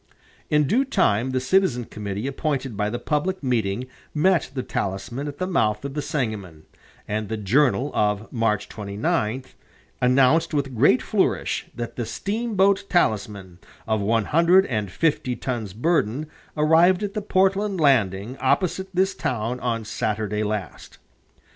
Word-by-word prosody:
In 150 -1 +3
due 245 - +2
time 130 - +1
the 130 0 0
citizen 130 -3 +1
committee 105 +1 -5
appointed 135 -3 -2
by 105 +1 -1
the 120 - -3
public 155 +7 -2
meeting 120 -3 0 0.3
met 175 +1 +2
the 130 - -2
Talisman 100 +9 -3
at 145 -1 -6
the 185 - -2
mouth 110 - 0
of 140 - -4
the 150 - -2
Sangamon, 105 - -4 0.4
and 105 0 -3
the 110 - -2
"Journal" 130 +6 +2
of 105 +1 0
March 115 -4 0
29 105 +3 -2 0.6
announced 135 +6 +3
with 135 -3 -1
great 130 +2 +4
flourish - - 0
that 120 -1 -6
the 120 -3 -3
"steamboat 200 - 0
Talisman, 100 - 0 0.3
of 110 -1 +1
one 110 +1 +1
hundred 170 +4 +4
and 105 -5 -2
fifty 130 - 0
tons 120 -7 -4
burden, 140 - 0 0.3
arrived 165 +5 +4
at 200 -1 -3
the 210 - -2
Portland 195 0 +1
landing 115 - +2
opposite 180 +8 +1
this 190 +1 +2
town 125 -3 -2
on 115 -3 -2
Saturday 105 -1 -2
last." 105 -2 -4
125 Hz, 145 wpm, -23 LUFS, 105-160 Hz, 0.6 s, great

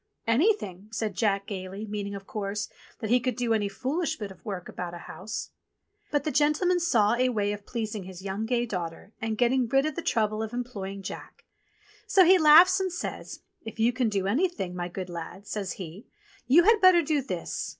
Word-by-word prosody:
"Anything," 230 - +1
said 220 -2 -2
Jack 200 0 +1
gaily, 195 +1 -6
meaning, 205 -1 -4
of 195 0 -8
course, 205 0 -4 0.3
that 220 - -3
he 250 - +5
could 250 +1 -2
do 240 -2 0
any 205 -2 0
foolish 310 - -2
bit 205 -3 -6
of 190 - -15
work 195 -5 -5
about 175 -1 -6
a 170 - -10
house. 215 +4 -6 0.6
But 290 -2 0
the 305 - -1
gentleman 300 +6 +2
saw 230 -12 +3
a 255 +1 +2
way 205 -4 0
of 205 -1 -9
pleasing 220 -4 -4
his 185 -1 -9
gay - - -12
young 200 +3 -3 0.2
daughter 180 0 -5
and 220 -1 -2
getting 245 +1 +2
rid 270 +4 +3
of 310 - -1
the - - -3
trouble 215 -6 0
of 220 +1 -4
employing 200 -6 -5
Jack; - - -9 0.6
so 380 -2 +6
he 370 +2 +7
laughs 320 +5 +8
and 380 -1 -1
says, 350 - -6 0.2
*'If 225 0 -9
you 235 +2 +3
can 245 -2 +1
do 195 -2 -1
anything, 230 - 0
my 175 -1 -3
good 180 +1 -6
lad," 175 +3 -8
says 200 -2 -3
he, 185 +3 -9 0.4
"you 310 +8 +6
had 440 +2 +5
better 370 -2 +7
do 300 -1 +1
this. 185 -10 -4
220 Hz, 200 wpm, -27 LUFS, 195-275 Hz, 0.6 s, laughs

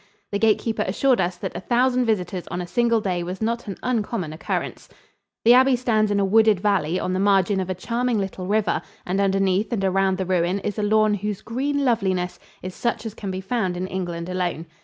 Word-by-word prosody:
The 200 - -1
gatekeeper 220 +1 +2
assured 250 +7 +2
us 175 0 -1
that - - -5
a - - -3
thousand 250 +3 +2
visitors 185 -5 -1
on 175 - -4
a 180 - -3
single 235 +3 +1
day 180 -3 -1
was 180 +2 -5
not 230 +1 -2
an 195 - -5
uncommon 220 -9 -2
occurrence. 155 - -4 0.6
The 235 - +8
abbey 260 +1 +5
stands 220 -4 +1
in 205 -1 +1
a 200 - +2
wooded 215 0 +4
valley 185 -4 +1
on 185 - -2
the 185 - 0
margin 195 0 +3
of 190 -1 -3
a 185 - -1
charming 235 +5 -1
little 190 -2 -4
river, 210 +1 +1 0.2
and 190 +2 0
underneath 195 +1 +1
and 200 -5 0
around 190 0 +2
the 190 - -2
ruin 180 0 +1
is 210 +2 -3
a - - +1
lawn 215 0 +3
whose 205 0 -3
green 280 +4 -1
loveliness 190 -7 0 0.2
is 185 0 -5
such 235 +1 -2
as 220 - -4
can 205 -2 -6
be 185 0 -4
found 190 -3 -1
in 180 - -2
England 175 -3 -4
alone. 180 -3 -2
200 Hz, 215 wpm, -23 LUFS, 185-225 Hz, 0.6 s, The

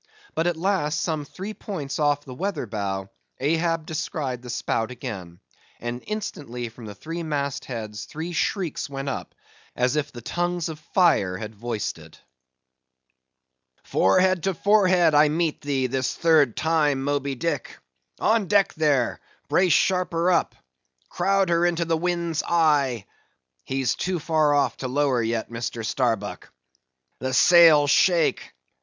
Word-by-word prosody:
But 165 +2 0
at 175 -2 0
last, 165 -4 0
some 155 -3 -2
three 195 +8 -7
points 160 -11 -5
off 145 -1 +1
the 130 - -8
weather 175 0 -3
bow, 100 -3 -4 0.3
Ahab 165 +3 0
descried 150 -5 -3
the 125 - -10
spout 115 -1 -1
again, 100 -9 -7 0.4
and 120 +1 -5
instantly 125 - -5
from 115 0 -12
the 105 - -8
three 165 +10 -6
mast 145 -3 -3
heads 110 -4 -6
three 165 +3 -6
shrieks 170 -3 -1
went 135 0 -4
up 135 - -6 0.4
as 125 +3 +1
if 150 -1 -1
the 120 -2 -10
tongues 175 +1 -2
of 155 -1 -7 0.2
fire 150 - +3
had 110 +2 -7
voiced 110 0 -4
it. - - -15 1.6
"Forehead 185 - +3
to 195 -2 0
forehead 185 -4 +4
I 150 +1 +6
meet 160 0 -1
thee, 140 -2 -1
this 130 0 -1
third 155 -7 +3
time, 150 -4 +1
Moby 140 -1 -1
Dick! 150 0 -3 0.4
On 220 -3 +2
deck 200 0 +3
there!—brace 155 +5 0
sharper 180 0 +2
up; - - +1 0.5
crowd 195 +1 +1
her 170 0 +2
into 175 -1 +1
the 165 0 +1
wind's 170 -1 -1
eye. 145 -10 +2 0.6
He's 135 -1 0
too 185 0 -2
far 155 -2 +2
off 140 -1 +1
to 130 - -4
lower 135 -2 +1
yet, 115 0 -2
Mr. 115 -1 -4
Starbuck. 115 -4 -2 0.7
The 130 0 -2
sails 160 -4 +7
shake! 170 -2 +2
150 Hz, 145 wpm, -24 LUFS, 125-170 Hz, 1.6 s, sails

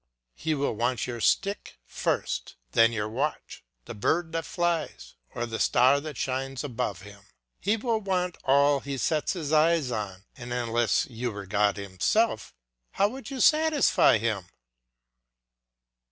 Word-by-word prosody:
He 155 - -2
will 140 -3 -1
want 120 +3 0
your 120 -2 -5
stick 200 - 0
first, - - -2 0.2
then 115 0 +5
your 105 -2 -2
watch, 135 +8 -4 0.2
the - - -7
bird 160 +10 0
that 165 0 -3
flies, 175 -2 -2 0.2
or 120 - -2
the 115 -1 -5
star 130 +3 +4
that 150 -3 -7
shines 135 +1 -3
above 120 -8 -3
him. 100 0 -14 0.3
He 210 +4 +1
will 225 0 0
want 180 -3 -1
all 140 +1 +4
he 140 0 -5
sets 155 +7 0
eyes 155 -3 +2
on, 100 -3 -5
and 120 -3 -9
unless 120 -1 +1
you 120 0 -4
were 100 -1 -7
God 105 +1 +1
himself, 100 - 0 0.4
how 200 +1 +2
could 265 -1 -8
you 270 -2 -6
satisfy 310 - +4
him? 105 -5 -2
135 Hz, 145 wpm, -27 LUFS, 115-165 Hz, 0.4 s, then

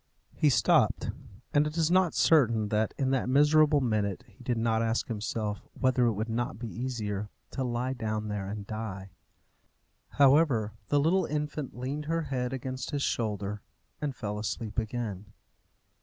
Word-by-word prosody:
He 150 - +3
stopped, 130 - +3 0.4
and 150 +1 +4
it 150 +2 -6
is 165 0 +2
not 185 -2 +3
certain 115 -9 +4
that, 110 +1 0
in 135 -1 +1
that 130 -2 0
miserable 150 +2 +5
minute, 105 -6 0
he 130 - -18
did 125 -2 0
not 115 0 +1
ask 115 0 0
himself 105 -1 -3
whether 130 -2 +3
it 115 - +2
would 110 +2 -3
not 115 -2 -2
be 115 +1 -5
easier 105 -4 -3 0.2
to 135 - -2
lie 125 +1 -1
down 110 -3 -3
there 105 -2 -3
and 105 0 -5
die. 100 -3 -6 1.1
However, 135 -7 +4
the 145 - +3
little 170 +4 +2
infant 150 -3 -3
leaned 140 +4 -3
her 165 +1 0
head 125 -4 -2
against 130 0 -4
his 145 -2 -1
shoulder, 105 -2 -2 0.4
and 145 -3 -2
fell 105 -3 -4
asleep 110 +1 -3
again. 105 -3 -4
120 Hz, 160 wpm, -29 LUFS, 105-140 Hz, 1.1 s, miserable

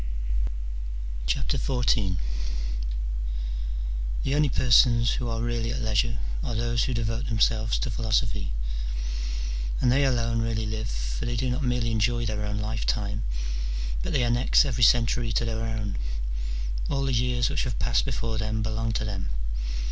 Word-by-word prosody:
XIV. 95 - +1 2.1
The 135 - +1
only 150 0 +4
persons 120 -2 +5
who 125 - -1
are 115 0 -1
really 120 -1 0
at 130 - -2
leisure 105 - +1 0.3
are 120 - -2
those 115 0 +1
who 130 - -1
devote 115 +1 -1
themselves 110 -1 +2
to 125 - -1
philosophy: 110 - 0 1.3
and 125 - +4
they 140 +3 +4
alone 115 -3 +2
really 115 -1 0
live: 110 +1 -2
for - - -3
they 120 - -1
do 125 +2 0
not 125 - 0
merely 125 -2 +1
enjoy 120 +2 +2
their 105 -1 -1
own 105 0 -2
life 110 +1 -2
time, 105 0 0 0.8
but - - -2
they 130 - +2
annex 120 +4 +4
every 125 -3 0
century 115 0 +4
to 120 - +2
their 115 -1 -1
own: 110 - -2 0.9
all 135 -1 +1
the 135 -1 +1
years 120 0 +2
which - - 0
have 120 -4 -2
passed - - +2
before 110 - -2
them 110 0 -1
belong 110 +1 -1
to 110 - 0
them. 100 - -3
115 Hz, 150 wpm, -27 LUFS, 110-120 Hz, 2.1 s, persons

